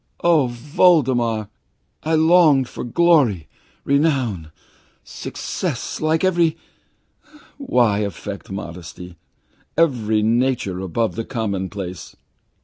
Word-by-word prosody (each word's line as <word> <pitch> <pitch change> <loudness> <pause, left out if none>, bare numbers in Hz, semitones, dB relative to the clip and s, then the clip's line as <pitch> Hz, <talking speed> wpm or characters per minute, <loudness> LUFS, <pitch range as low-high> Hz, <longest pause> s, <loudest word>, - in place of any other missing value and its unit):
"Oh, 160 -6 +4
Voldemar, 120 - +2 0.5
I 160 +1 0
longed 160 -5 +4
for - - -7
glory, 125 - +2 0.4
renown, 130 - 0 0.5
success, - - -5
like 155 +2 +1
every 170 -3 +2 1.0
why 120 - +2
affect 100 0 -5
modesty? 90 -2 -8 0.6
every 110 -9 +2
nature 115 -4 0
above 95 +5 -1
the 115 - -4
commonplace. 100 -6 -5
120 Hz, 85 wpm, -20 LUFS, 100-155 Hz, 1.0 s, Oh